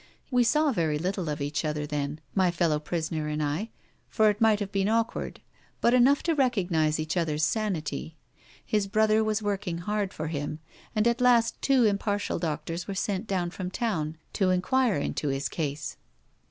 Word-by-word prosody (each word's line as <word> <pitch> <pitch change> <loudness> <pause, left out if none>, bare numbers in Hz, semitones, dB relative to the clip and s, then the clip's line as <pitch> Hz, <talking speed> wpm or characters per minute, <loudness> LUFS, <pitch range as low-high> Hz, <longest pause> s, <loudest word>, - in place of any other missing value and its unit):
We 250 -1 +4
saw 300 +5 +3
very 160 - 0
little 180 +1 -2
of 150 -1 -3
each 145 0 -1
other 150 -1 -2
then, 145 +1 -3
my 190 -2 +3
fellow 165 -3 +1
prisoner 160 0 -3
and 150 0 -1
I, 155 +10 -2 0.4
for 215 -1 +4
it 205 +2 -8
might 220 -2 +5
have 200 -2 -4
been 195 0 +1
awkward, 230 +1 -1 0.4
but 235 - +3
enough 255 +3 +5
to 335 - +2
recognise 180 - +1
each 155 +2 -2
other's 155 -3 0
sanity. 160 -5 -2 0.5
His 210 -2 0
brother 215 +2 +3
was 215 0 0
working 200 -4 -2
hard 205 +2 -2
for 155 - -5
him, 150 -1 -3 0.4
and 215 +2 +3
at 235 +1 +1
last 240 -2 +3
two 265 -4 +4
impartial 205 -1 0
doctors 165 +1 -3
were 200 - -4
sent 200 +2 -2
down 180 -3 -1
from 180 0 -5
town 165 -8 -2 0.2
to 190 -2 +2
enquire 210 +5 +2
into 150 - -2
his 135 +1 -1
case. 150 -2 -4
185 Hz, 180 wpm, -27 LUFS, 155-215 Hz, 0.5 s, might